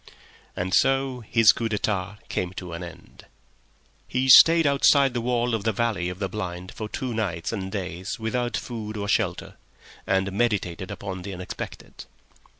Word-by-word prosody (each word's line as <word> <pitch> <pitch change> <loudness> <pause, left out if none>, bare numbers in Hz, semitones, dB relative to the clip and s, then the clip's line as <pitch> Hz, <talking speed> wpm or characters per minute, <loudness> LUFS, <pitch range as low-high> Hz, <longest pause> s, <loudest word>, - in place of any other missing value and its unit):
And 95 +1 -3
so 135 +1 +2
his 115 -3 +6
coup 115 -1 -3
d'etat 100 -2 -2
came 90 0 -3
to 90 -2 -7
an 85 - -6
end. 85 - -12 0.8
He 130 +1 -1
stayed 165 +5 +8
outside 140 -1 +4
the 120 - -1
wall 120 0 0
of 110 -3 -1
the 110 - +1
valley 105 -5 -1
of 90 - -6
the 100 0 -2
blind 90 -2 -6
for 110 -1 -6
two 125 +1 -4
nights 90 -7 -2
and 95 -4 -4
days 95 -2 -4
without 120 +2 -2
food 110 -3 -6
or 100 0 -3
shelter, - - -1 0.5
and 95 0 +1
meditated 95 -4 -1
upon 95 -2 -6
the 95 +1 -6
Unexpected. 90 0 -8
105 Hz, 160 wpm, -25 LUFS, 95-120 Hz, 0.8 s, stayed